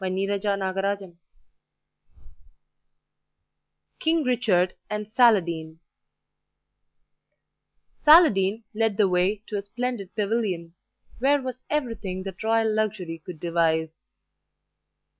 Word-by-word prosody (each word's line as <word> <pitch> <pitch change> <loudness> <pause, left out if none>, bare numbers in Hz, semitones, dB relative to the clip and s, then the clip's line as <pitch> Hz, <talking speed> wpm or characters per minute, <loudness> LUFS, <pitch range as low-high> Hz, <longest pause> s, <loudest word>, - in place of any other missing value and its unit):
WILFRED 195 +2 -1
CAMPBELL 195 -2 -2 2.8
KING 320 0 +1
RICHARD 215 -8 +1 0.2
AND 210 0 -4
SALADIN 170 -9 +2 2.2
Saladin 230 - +5
led 220 -2 0
the 210 -3 +4
way 185 +3 +1
to 210 - -4
a - - -2
splendid 210 0 -4
pavilion 200 -6 -2 0.5
where 280 +3 +3
was 255 -1 -6
everything 225 -10 -3
that 190 -2 -8
royal 225 0 +1
luxury 195 -7 -2
could 175 -3 -9
devise. 160 -1 0
200 Hz, 85 wpm, -25 LUFS, 180-225 Hz, 2.8 s, Saladin